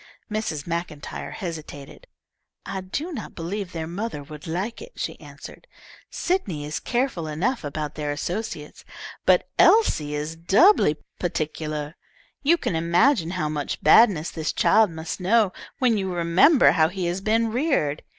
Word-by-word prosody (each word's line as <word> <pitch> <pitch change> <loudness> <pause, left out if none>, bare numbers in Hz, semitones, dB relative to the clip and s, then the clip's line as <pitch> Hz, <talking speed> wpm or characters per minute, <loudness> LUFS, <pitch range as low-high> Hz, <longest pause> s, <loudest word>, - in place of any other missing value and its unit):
Mrs. 190 -9 -3
MacIntyre 170 -3 -5
hesitated. 155 -6 -8 0.6
"I 195 -1 -4
do 285 - -4
not 305 - -7
believe 185 +3 -4
their 165 -2 -4
mother 175 -2 -5
would 150 +3 -11
like 190 +8 -3
it," - - -11
she - - -5
answered. - - -12 0.4
"Sydney 195 - -2
is 150 +1 -3
careful 240 -10 -1
enough 185 - -1
about 150 0 -4
their 150 -1 -4
associates, 160 0 -5 0.4
but - - +4
Elise 440 - +5
is 150 +2 -4
doubly 180 - +4 0.2
particular. 155 -2 -3 0.5
You 320 +4 +4
can 185 - -2
imagine 170 - +3
how 155 - 0
much 150 -1 -4
badness 170 -1 +5
this 160 -2 -2
child 220 -2 +4
must 160 +2 -6
know 200 +1 +3 0.2
when 245 -6 +2
you 190 -1 -2
remember 180 - +5
how 160 -2 +3
he 185 0 -4
has 175 +2 -2
been 225 +2 +1
reared. 235 - 0
175 Hz, 145 wpm, -24 LUFS, 155-220 Hz, 0.6 s, Elise